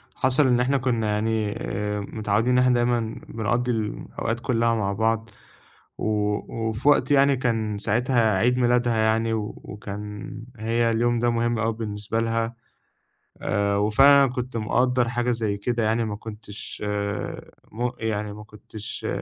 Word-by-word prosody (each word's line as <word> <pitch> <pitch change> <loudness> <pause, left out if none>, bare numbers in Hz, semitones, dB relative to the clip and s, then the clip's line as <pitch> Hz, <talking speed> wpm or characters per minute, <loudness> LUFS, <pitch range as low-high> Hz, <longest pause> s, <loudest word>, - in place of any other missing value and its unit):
حصل 130 +2 +3
إن 125 -1 +3
إحنا 135 +3 +2
كنا 120 -4 0
يعني، 110 0 0
آآ، 105 -1 -3
متعوِّدين، 110 +4 0
إحنا 125 0 +4
دايمًا 120 0 +2 0.3
بنقضِّي 120 +3 -1
الـم 110 -2 -3
الأوقات 115 +1 -2
كلَّها 115 -1 +1
مع 100 -3 -1
بعض. 110 +1 0 0.7
و - - -2 0.6
وفي 110 +6 +1
وقت 145 - +3
يعني، 140 0 +5
كان 110 -4 -1
ساعتها 115 -1 +2
عيد 125 +4 +2
ميلادها 120 -1 +2
يعني، 110 +1 +2
و 105 -1 -2
وكان 105 0 -7 0.2
هي 115 +1 +1
اليوم 120 +1 +1
ده 120 +1 +2
مهم 115 0 0
أوي 115 0 +1
بالنسبة 110 0 -3
لها. 115 0 -1 0.9
آآ، 100 -1 +1
وفعلًا، 135 +7 +6
أنا 130 - +1
كنت 125 -1 -4
مقدِّر 125 +2 +1
حاجة 120 0 0
زيّ 110 -3 -1
كده 115 +2 -1
يعني، 110 +1 +1
ما 105 -1 -3
كنتش 105 -1 -8
آآ، 105 0 -3 0.2
م 120 +3 -1
يعني، 105 -2 -2
ما 105 0 -9
كنتش 105 0 -8
115 Hz, 155 wpm, -24 LUFS, 105-120 Hz, 0.9 s, وفعلًا